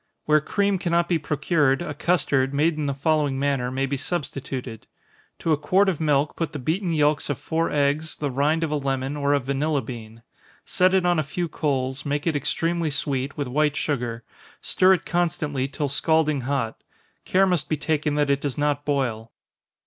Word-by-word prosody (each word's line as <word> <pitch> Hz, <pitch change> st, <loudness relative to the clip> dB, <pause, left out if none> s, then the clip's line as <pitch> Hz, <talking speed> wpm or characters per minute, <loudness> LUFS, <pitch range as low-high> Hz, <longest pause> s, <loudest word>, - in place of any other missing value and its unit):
Where 155 Hz, 0 st, +4 dB
cream 200 Hz, +4 st, 0 dB
cannot 170 Hz, 0 st, +1 dB
be 170 Hz, -2 st, +1 dB
procured, 150 Hz, -1 st, +1 dB
a -, -, -4 dB
custard, 140 Hz, -6 st, +1 dB
made 155 Hz, +3 st, +2 dB
in 150 Hz, -1 st, -2 dB
the 140 Hz, -, 0 dB
following 145 Hz, -1 st, +1 dB
manner, 135 Hz, -3 st, 0 dB
may 135 Hz, +1 st, -1 dB
be 140 Hz, +1 st, -2 dB
substituted: 135 Hz, -6 st, -4 dB, 0.5 s
To 165 Hz, -, -1 dB
a 155 Hz, -, +4 dB
quart 185 Hz, +7 st, +3 dB
of 175 Hz, -, -2 dB
milk 150 Hz, -1 st, +1 dB
put 165 Hz, -1 st, -3 dB
the -, -, -3 dB
beaten 170 Hz, +7 st, -1 dB
yelks 150 Hz, -2 st, +1 dB
of 145 Hz, -, -1 dB
four 165 Hz, +1 st, -1 dB
eggs, 145 Hz, +2 st, 0 dB
the 145 Hz, -2 st, -3 dB
rind 150 Hz, +5 st, +1 dB
of 160 Hz, -, -1 dB
a 150 Hz, -, +1 dB
lemon, 135 Hz, 0 st, -2 dB
or 145 Hz, 0 st, +2 dB
a -, -, +2 dB
vanilla 140 Hz, +2 st, -1 dB
bean 115 Hz, -1 st, -9 dB, 0.4 s
set 185 Hz, +1 st, +3 dB
it 185 Hz, -2 st, +2 dB
on 175 Hz, -2 st, +3 dB
a -, -, +1 dB
few 170 Hz, +5 st, -3 dB
coals, 135 Hz, -4 st, -2 dB
make 145 Hz, 0 st, -2 dB
it 165 Hz, -3 st, +1 dB
extremely 165 Hz, +3 st, 0 dB
sweet, 140 Hz, -1 st, -2 dB
with 145 Hz, -2 st, -2 dB
white 150 Hz, +3 st, +1 dB
sugar 120 Hz, -6 st, -2 dB, 0.4 s
stir 185 Hz, +1 st, +4 dB
it 180 Hz, -, -1 dB
constantly 150 Hz, -5 st, -1 dB
till 145 Hz, +1 st, -3 dB
scalding 150 Hz, +1 st, +1 dB
hot 115 Hz, -6 st, -2 dB, 0.4 s
care 190 Hz, +1 st, +3 dB
must 175 Hz, -6 st, 0 dB
be 155 Hz, -, 0 dB
taken 150 Hz, 0 st, 0 dB
that 145 Hz, -1 st, +2 dB
it 140 Hz, 0 st, +1 dB
does 140 Hz, -3 st, -3 dB
not 145 Hz, -1 st, 0 dB
boil. 120 Hz, -6 st, -1 dB
145 Hz, 195 wpm, -24 LUFS, 135-160 Hz, 0.5 s, Where